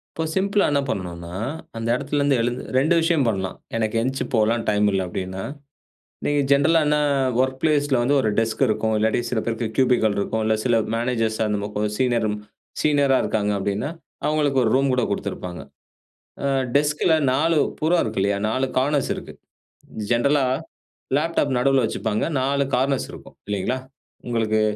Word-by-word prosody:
இப்போ 160 - -2
சிம்பிளா 200 +2 +2
என்ன 140 -1 +2
பண்ணனுன்னா, 85 -3 -5 0.4
அந்த 115 0 -4
எடத்திலருந்து 140 +1 +1
எழுந்து 120 +2 -1
2 155 +6 +3
விஷயம் 165 -3 +2
பண்ணலாம். 95 -3 -2 0.2
எனக்கு 110 0 -1
எந்ச்சு 130 +3 -1
போலாம் 115 +1 +2
டைம் 105 0 +2
இல்ல 95 -1 0
அப்டின்னா! 95 +1 -5 0.8
நீங்க 145 0 +2
ஜென்ரலா 145 +4 +4
என்ன 150 0 +3 0.4
வொர்க் 130 0 +1
பிளேஸ் 150 -2 +2
ல - - +5
வந்து 140 +4 +2
ஒரு 110 - 0
டெஸ்க் 115 +2 0
இருக்கும், 110 0 0
இல்லாட்டி 110 +2 +1
சில 120 - -1
பேருக்கு 115 -1 -2
கியூபிக்கள் 120 -5 +3
இருக்கும், 110 +2 -1
இல்ல 110 0 +2
சில 115 -3 +3
மேனேஜர்ஸ் 115 -2 0
அந்த 105 -1 0
மொ 105 - -3
கொஞ் 105 0 +1
சீனியரும் 115 -5 +1 0.5
சீனியரா 140 -3 +3
இருக்காங்க 105 -1 0
அப்டின்னா, 100 +9 -2 0.4
அவுங்களுக்கு 145 -3 +2
ஒரு 110 - +2
ரூம் 135 0 +3
கூட 125 - +1
குடுத்திருப்பாங்க. 90 -3 -4 0.8
ஆ - - +2 0.3
டெஸ்க்ல 150 +3 +2 0.2
4 160 +3 +2 0.2
புறம் 165 +3 +3
இருக்கு - - -2
இல்லையா, 100 0 +1
4 130 +3 0
கானர்ஸ் 140 +1 +1
இருக்கு. - - -9 0.8
ஜென்ரலா 140 +4 +3 0.7
லேப்டாப் 150 -4 0
நடுவுல 135 -2 +3
வச்சுப்பாங்க. 110 -1 -1 0.2
4 140 +1 +1
கார்னர்ஸ் 135 +1 0
இருக்கும் - - -12
இல்லைங்களா? 105 +6 -1 0.5
உங்களுக்கு 110 -2 +1
125 Hz, 155 wpm, -23 LUFS, 110-140 Hz, 0.8 s, ல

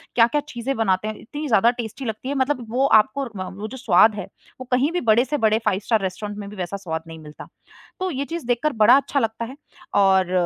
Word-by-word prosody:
क्या-क्या 240 +5 +4
चीज़ें 255 +1 -3
बनाते 210 -2 +1
हैं। 215 - -4
इतनी 295 +5 -7
ज़्यादा 230 -1 +4
टेस्टी 225 +4 -7
लगती 220 +3 -5
है 285 - -2
मतलब 260 -2 0
वो 265 +2 +2 0.2
आपको 275 +6 -5
म 185 - -4
वो 215 - -4
जो 260 - -9
स्वाद 215 -2 +4
है, 205 - -5 0.4
वो 255 - -6
कहीं 260 +5 +2
भी 355 - -1
बड़े 230 +2 +3
से 295 +2 -2
बड़े 220 -1 +2
फाइव-स्टार 205 +2 +1
रेस्टोरेंट 205 +2 -4
में 200 -1 -7
भी 210 - -10
वैसा 185 0 -4
स्वाद 160 -4 -5
नहीं 160 0 -10
मिलता, 150 -1 -11 0.5
तो 370 0 -1
ये 280 -1 -3
चीज़ 335 -2 -6
देखकर 250 +5 0
बड़ा 220 +3 +6
अच्छा 280 0 0
लगता 225 -1 -2
है। 260 - -9 0.4
और 190 -2 +4
225 Hz, 230 wpm, -22 LUFS, 200-265 Hz, 0.5 s, बड़ा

